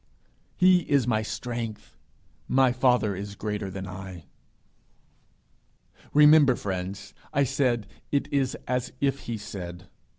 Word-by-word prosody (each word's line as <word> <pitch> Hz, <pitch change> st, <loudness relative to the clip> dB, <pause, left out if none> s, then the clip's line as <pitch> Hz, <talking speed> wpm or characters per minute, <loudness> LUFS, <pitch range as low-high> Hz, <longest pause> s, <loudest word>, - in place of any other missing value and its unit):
He 185 Hz, 0 st, +6 dB
is 140 Hz, -5 st, +3 dB
my 110 Hz, -3 st, +1 dB
strength. 115 Hz, -1 st, -5 dB, 0.5 s
My 130 Hz, -1 st, +4 dB
father 125 Hz, -5 st, +2 dB
is 100 Hz, +2 st, -6 dB
greater 105 Hz, -1 st, -3 dB
than 95 Hz, 0 st, -6 dB
I.' 95 Hz, -2 st, -8 dB, 1.9 s
Remember, 150 Hz, -3 st, +7 dB
friends, 95 Hz, 0 st, -5 dB, 0.2 s
I 140 Hz, -, +2 dB
said, 120 Hz, -4 st, +1 dB, 0.3 s
'It 140 Hz, -, +1 dB
is 135 Hz, -2 st, +1 dB
as 125 Hz, -1 st, -2 dB
if 140 Hz, -1 st, +1 dB
he 115 Hz, -, -2 dB
said.' 90 Hz, -4 st, -8 dB
115 Hz, 120 wpm, -26 LUFS, 100-135 Hz, 1.9 s, Remember